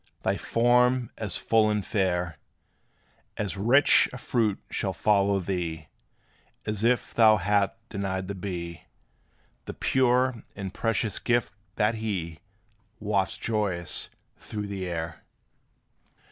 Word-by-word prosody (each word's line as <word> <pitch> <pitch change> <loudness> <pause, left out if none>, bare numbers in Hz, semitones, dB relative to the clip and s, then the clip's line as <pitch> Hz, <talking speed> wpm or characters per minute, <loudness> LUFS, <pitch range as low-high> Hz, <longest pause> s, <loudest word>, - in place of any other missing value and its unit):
Thy - - +1
form 125 +1 +2
as 105 -5 -3
full 110 -1 +3
and 105 -2 -1
fair 90 -5 -1 1.0
As 100 -2 -2
rich 120 +9 +5
a 125 - -7
fruit 115 -4 0
shall - - -1
follow 100 -2 +2
thee, 85 -4 -3 0.8
As 105 0 -2
if 120 +1 +1
thou 110 -2 +6
hadst 100 +1 +1
denied 95 -2 -3
the 100 - -3
bee 85 -4 -6 0.8
The - - -7
pure 125 -2 +2
and 95 -2 -5
precious 115 -2 -1
gift, 120 -2 0 0.2
that 105 +2 +2
he 85 -7 -3 0.6
Wafts 100 -3 0
joyous 100 -6 -1 0.3
through 105 -1 -5
the 100 -2 -4
air. 85 -2 -5
100 Hz, 120 wpm, -27 LUFS, 95-115 Hz, 1.0 s, thou